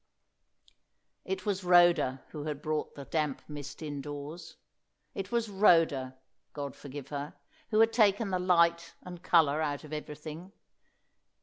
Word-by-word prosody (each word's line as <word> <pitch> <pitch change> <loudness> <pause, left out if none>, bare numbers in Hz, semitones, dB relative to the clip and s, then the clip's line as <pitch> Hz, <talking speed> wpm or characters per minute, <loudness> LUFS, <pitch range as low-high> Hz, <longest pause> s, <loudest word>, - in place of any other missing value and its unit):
It 385 - -4
was 200 -2 -1
Rhoda 175 -7 +4
who 150 -2 -7
had 150 -1 -4
brought 155 -1 -2
the 140 - -8
damp 150 -3 -2
mist 145 0 -8
indoors. 145 +2 -7 0.6
It 195 -1 -5
was 235 -1 0
Rhoda 165 -10 +3 0.4
God 140 -2 -5
forgive 140 -1 -9
her 145 0 -5 0.3
who 215 0 +4
had 225 0 +4
taken 210 -2 +3
the 185 - 0
light 170 -2 +2
and 175 -1 -9
colour 155 -4 +3
out 145 -1 -2
of 155 0 -10
everything. 155 +4 -7
155 Hz, 135 wpm, -30 LUFS, 145-180 Hz, 0.6 s, Rhoda